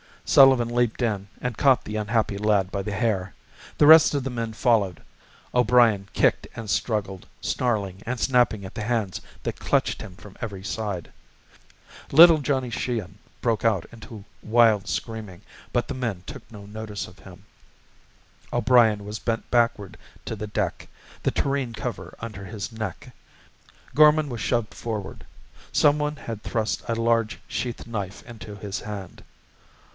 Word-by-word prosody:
Sullivan 130 -4 +6
leaped 120 0 0
in 105 -4 -1
and 125 -3 -3
caught 135 -3 +4
the 105 - -5
unhappy 105 -1 0
lad 100 -2 +1
by 100 - -2
the 105 +1 -4
hair. 100 -2 -1 0.4
The 150 - +5
rest 155 0 +8
of 140 - 0
the 135 - -3
men 115 -2 -3
followed, 110 -6 +1 0.5
O'Brien 120 -5 +4
kicked - - +2
and 110 -2 -7
struggled, 100 -3 -2
snarling 100 -6 -1
and 125 +2 -3
snapping 120 -6 +2
at 95 - -9
the - - -5
hands 110 -4 -1 0.2
that - - -4
clutched - - 0
him 100 -4 -9
from 100 +1 -14
every 100 -5 -5
side. 100 -5 -4 1.0
Little 165 +2 +9
Johnny 135 -3 -1
Sheehan 115 -6 -3 0.2
broke 115 -2 0
out 105 -7 +2
into 110 -2 -11 0.2
wild 110 -3 +4
screaming, 105 -5 -5 0.3
but 120 -1 +1
the - - -4
men 115 -8 -3
took - - -10
no 105 -2 -10
notice 105 0 -6
of 90 - -16
him. 95 0 -14 1.1
O'Brien 110 -5 +4
was 105 +1 -5
bent 115 -1 -3
backward 115 -5 +1 0.3
to - - -4
the 105 - -5
deck, 105 -3 -3 0.3
the - - +1
tureen 135 -4 -1
cover 115 +2 -6
under 105 -4 -7
his 100 +2 -6
neck. 110 +3 -6 0.8
Gorman 150 0 +5
was 120 -3 -5
shoved 120 -3 0
forward. 110 -4 -6 0.5
Some 145 0 +4
one 150 0 -1
had 115 -7 -7
thrust 110 0 -2
a 115 - 0
large 115 -1 +1
sheath 120 -2 -4
knife 105 -4 -5
into 110 -3 -10
his 100 -2 -5
hand. 100 -4 -8
110 Hz, 155 wpm, -25 LUFS, 100-120 Hz, 1.1 s, Little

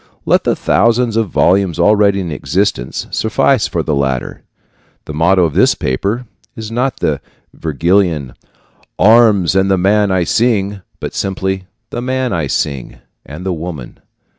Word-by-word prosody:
Let - - +2
the - - +2
thousands 115 +2 +1
of 115 -3 0
volumes 95 0 +2
already 100 +1 +3
in 85 -3 -5
existence 70 -2 -2
suffice 110 +2 +1
for 85 - -2
the 75 - -1
latter. 65 -3 -2 0.6
The 75 - -7
motto 90 +4 +3
of 80 -3 0
this - - +3
paper 100 - -2 0.3
is 110 0 -7
not 125 +3 -2
the - - 0 0.3
Vergilian 80 -2 0 0.6
"Arms 105 -5 +4
and 95 0 +2
the 95 - +3
man 100 +3 +2
I 95 -2 +1
sing," 100 -1 0 0.2
but - - -5
simply 95 -1 -3 0.2
"The - - -4
man 130 0 -1
I 80 -4 -1
sing" 65 -2 -3 0.3
and 75 +6 -9
the 95 - -1
woman. 80 -6 -7
95 Hz, 150 wpm, -15 LUFS, 80-105 Hz, 0.6 s, Arms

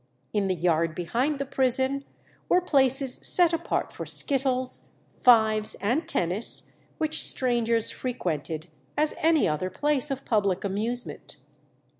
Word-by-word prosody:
In 205 -2 0
the 185 - 0
yard 165 -1 0
behind 240 - -1
the 275 - -3
prison 265 +1 +1 0.4
were 360 - +5
places 270 -5 +3
set 345 -2 +3
apart 330 +1 -2
for - - -6
skittles, 260 -2 -2 0.2
fives, 220 -3 +3
and 250 - -1
tennis, 185 - +2 0.2
which 315 -1 0
strangers 235 -3 +1
frequented 160 - -4 0.3
as 305 0 +1
any 320 -2 +3
other 155 +4 -2
place 295 +7 -1
of 275 0 -5
public 200 -5 0
amusement. 220 +5 -4
245 Hz, 125 wpm, -26 LUFS, 195-275 Hz, 0.4 s, were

